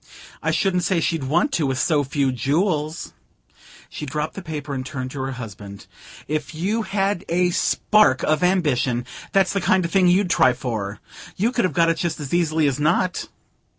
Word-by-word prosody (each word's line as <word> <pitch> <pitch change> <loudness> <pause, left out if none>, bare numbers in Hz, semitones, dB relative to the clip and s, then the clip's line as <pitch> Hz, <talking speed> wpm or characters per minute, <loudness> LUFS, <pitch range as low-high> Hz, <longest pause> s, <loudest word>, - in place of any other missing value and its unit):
"I - - -1
shouldn't 180 -2 +1
say 185 -1 +1
she'd 165 -4 -1
want 170 - +1
to, 160 - 0
with 130 -1 -1
so 150 0 +2
few 140 -1 0
jewels 150 - -1 0.4
" - - -22
She 150 - -6
dropped 150 +3 -3
the 195 - -7
paper 150 -4 -5
and 130 -1 -3
turned 130 -1 -5
to 135 - -5
her 135 0 -3
husband. 105 -5 -9 0.4
"If 155 +1 -3
you 200 +8 -1
had 195 -3 -1
a 180 +1 +2
spark 205 -5 +3
of 155 0 +1
ambition, 140 -10 +1 0.3
that's 190 -2 +2
the 200 - 0
kind 185 0 +2
of 170 - -4
thing 185 -1 +4
you'd 180 +1 +3
try 130 -4 +4
for. 110 -6 -4 0.4
You 225 +6 +1
could 240 -4 +1
have 185 - -1
got 165 -1 +4
it 165 - +1
just 170 -2 -2
as 145 -1 -6
easily 160 -3 +2
as 140 -1 0
not!" 170 +4 +1
155 Hz, 195 wpm, -22 LUFS, 135-180 Hz, 0.4 s, thing